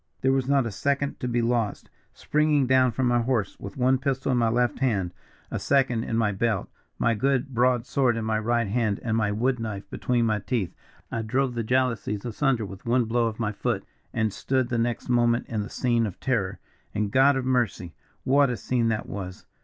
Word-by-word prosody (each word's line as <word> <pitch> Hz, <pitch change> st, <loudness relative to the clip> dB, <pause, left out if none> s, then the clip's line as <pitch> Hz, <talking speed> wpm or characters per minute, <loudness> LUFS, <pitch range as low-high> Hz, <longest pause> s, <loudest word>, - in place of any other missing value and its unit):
"There 130 Hz, 0 st, +3 dB
was 135 Hz, -1 st, 0 dB
not 140 Hz, -2 st, +3 dB
a 115 Hz, -, -3 dB
second 140 Hz, +6 st, -1 dB
to 125 Hz, -, -3 dB
be 120 Hz, -1 st, 0 dB
lost. 115 Hz, -3 st, -1 dB, 0.2 s
Springing 150 Hz, -2 st, +1 dB
down 130 Hz, -1 st, +4 dB
from 130 Hz, +3 st, -1 dB
my 120 Hz, -1 st, +3 dB
horse, 115 Hz, -5 st, -1 dB
with 100 Hz, +4 st, -8 dB
one 130 Hz, +1 st, +3 dB
pistol 135 Hz, 0 st, -1 dB
in 125 Hz, -, +2 dB
my 115 Hz, -1 st, +3 dB
left 120 Hz, -1 st, +1 dB
hand, 100 Hz, -9 st, 0 dB, 0.4 s
a -, -, -2 dB
second 130 Hz, -4 st, +1 dB
in 115 Hz, -, -1 dB
my 110 Hz, -2 st, +2 dB
belt, 105 Hz, 0 st, -1 dB, 0.3 s
my 115 Hz, -, +2 dB
good 135 Hz, +3 st, 0 dB
broad 125 Hz, 0 st, +2 dB
sword 125 Hz, -4 st, +1 dB
in 115 Hz, -, -3 dB
my 110 Hz, -1 st, +1 dB
right 120 Hz, +1 st, +1 dB
hand, 110 Hz, -1 st, 0 dB
and 115 Hz, -2 st, 0 dB
my 105 Hz, -2 st, +1 dB
wood 125 Hz, +4 st, 0 dB
knife 105 Hz, -3 st, -5 dB
between 120 Hz, -2 st, 0 dB
my 110 Hz, -2 st, +1 dB
teeth, 105 Hz, -3 st, -2 dB, 0.4 s
I 115 Hz, -, -1 dB
drove 125 Hz, +4 st, 0 dB
the 120 Hz, -, -2 dB
frail 130 Hz, +3 st, +3 dB
jalousies 105 Hz, -2 st, -5 dB
asunder 120 Hz, -1 st, 0 dB
with 95 Hz, -1 st, -10 dB
one 120 Hz, +1 st, +2 dB
blow 115 Hz, +1 st, +1 dB
of 110 Hz, 0 st, -5 dB
my 110 Hz, -2 st, 0 dB
foot, 100 Hz, -, -2 dB, 0.3 s
and 110 Hz, -3 st, 0 dB
stood 130 Hz, -2 st, 0 dB
the 120 Hz, -, 0 dB
next 120 Hz, 0 st, -1 dB
moment 120 Hz, -1 st, +2 dB
in 110 Hz, -3 st, -2 dB
the 105 Hz, -, -6 dB
scene 120 Hz, -3 st, +1 dB
of 95 Hz, -, -8 dB
terror. 110 Hz, -8 st, -1 dB, 0.4 s
And 105 Hz, -1 st, -1 dB
God 135 Hz, +3 st, +5 dB
of 130 Hz, -1 st, -2 dB
mercy! 115 Hz, -9 st, 0 dB, 0.3 s
what 140 Hz, +1 st, +4 dB
a 120 Hz, -, -2 dB
scene 120 Hz, +3 st, 0 dB
that 110 Hz, -1 st, -1 dB
was! 95 Hz, -2 st, -7 dB
120 Hz, 215 wpm, -26 LUFS, 110-130 Hz, 0.4 s, God